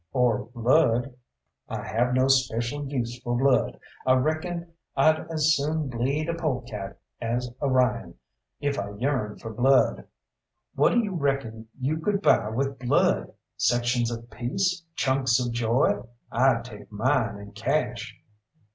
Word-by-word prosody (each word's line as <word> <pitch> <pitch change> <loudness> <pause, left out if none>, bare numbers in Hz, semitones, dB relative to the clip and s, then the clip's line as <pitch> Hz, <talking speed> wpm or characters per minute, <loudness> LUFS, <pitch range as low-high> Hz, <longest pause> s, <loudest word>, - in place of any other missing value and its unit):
"Or 120 -4 +2
blood!" 125 +1 +3 0.6
"I - - -4
have 125 +3 0
no 130 0 +4
speshul 130 +1 +1
use 120 -3 -3
fo' 120 -1 -2
blood. 130 -2 +2 0.2
I 130 - +4
reckon 165 +5 -1 0.2
I'd 155 +4 +3
as 155 -1 +3
soon 150 +1 -1
bleed 135 +6 -1
a 170 - 0
polecat 125 - -4 0.2
as 120 +1 -2
a 140 - +1
Ryan, 125 -3 +1 0.4
if 145 -1 -1
I 100 0 -3
yearned 125 -5 -1
for 115 -1 -6
blood. 130 +4 +3 0.7
What - - +4
d'you 225 -5 +1
reckon 135 -8 -2
you 140 +5 0
could 200 +4 -1
buy 105 - +4
with 135 +4 -2
blood 125 -1 +2 0.3
sections 120 0 +1
of 115 0 -6
peace, 180 - -1
chunks 130 -2 +2
of 125 -1 -1
joy? 120 +3 +1 0.3
I'd 120 -1 +3
take 105 -4 -11
mine 115 0 +1
in 100 0 -10
cash." 125 +3 -2
130 Hz, 140 wpm, -26 LUFS, 120-145 Hz, 0.7 s, no